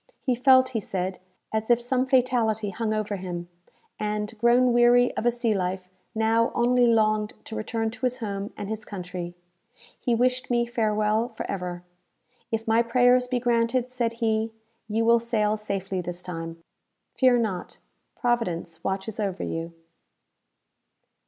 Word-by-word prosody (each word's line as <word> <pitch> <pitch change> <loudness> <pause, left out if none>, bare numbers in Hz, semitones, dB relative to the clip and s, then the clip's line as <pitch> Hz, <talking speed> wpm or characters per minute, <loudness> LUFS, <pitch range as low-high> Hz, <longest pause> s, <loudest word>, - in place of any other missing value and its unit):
He 255 - +2
felt, 260 +1 +5
he 235 -3 -2
said, 185 -2 -3 0.3
as 220 +1 -1
if 240 -1 +5
some 250 +2 0
fatality 235 -5 +2
hung 220 +3 -2
over 215 -1 -1
him; 175 -2 -6 0.5
and, 210 +1 -2
grown 240 +2 +4
weary 240 +1 +5
of 235 - 0
a - - +5
sea 235 -2 0
life, 185 -1 -2 0.3
now 225 +1 +2
only 245 +1 +4
longed 215 -2 +2
to 220 - -7
return 225 +1 -2
to 255 - -4
his 250 0 -3
home 200 -3 -4
and 205 - -5
his 220 +1 -4
country. 180 -3 -6 0.6
He 240 - +1
wished 250 +2 +1
me 240 -1 +2
farewell 215 -1 +1
for - - -6
ever. 180 -2 -4 0.7
"If 225 0 -2
my 225 +1 +4
prayers 245 +1 +4
be 250 -1 0
granted," 240 +1 +1
said 235 -2 -1
he, 225 -1 0 0.4
"you 225 +1 0
will 235 0 +5
sail 215 -2 +1
safely 195 -3 -3
this 175 0 -6
time. 165 -2 -6 0.5
Fear 255 -2 +4
not 210 -6 -3 0.4
Providence 175 -9 -1
watches 195 +3 -3
over 195 -3 -2
you." 165 +1 -4
220 Hz, 150 wpm, -26 LUFS, 200-240 Hz, 0.7 s, felt